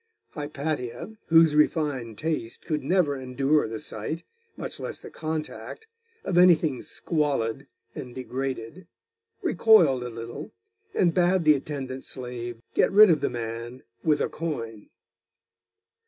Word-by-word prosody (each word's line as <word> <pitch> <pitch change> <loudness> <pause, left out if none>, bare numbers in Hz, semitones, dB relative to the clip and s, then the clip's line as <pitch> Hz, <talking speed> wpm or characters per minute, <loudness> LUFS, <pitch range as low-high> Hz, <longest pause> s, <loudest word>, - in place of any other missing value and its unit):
Hypatia, 150 - -4
whose 165 -1 +6
refined 145 -7 +1
taste 155 -8 -3
could 155 -4 -2
never 160 -1 +2
endure 135 +3 +1
the 110 0 -5
sight, 155 +10 -4 0.3
much - - -6
less - - -5
the - - -11
contact, 160 - -5 0.4
of 175 - +2
anything 160 -7 +5
squalid 140 -5 -1 0.3
and 125 -1 -8
degraded, 130 +5 -5 0.6
recoiled 165 - +5
a 125 - -4
little, 115 +5 -8 0.4
and 175 -3 +3
bade 180 0 +3
the 155 -1 +7
attendant 135 -2 -5
slave 120 -2 -5
get - - +3
rid 205 -1 +8
of 155 -4 +2
the - - +1
man 115 +1 -6 0.2
with 155 -2 +3
a - - +2
coin. 115 -10 -5
145 Hz, 125 wpm, -26 LUFS, 125-160 Hz, 0.6 s, rid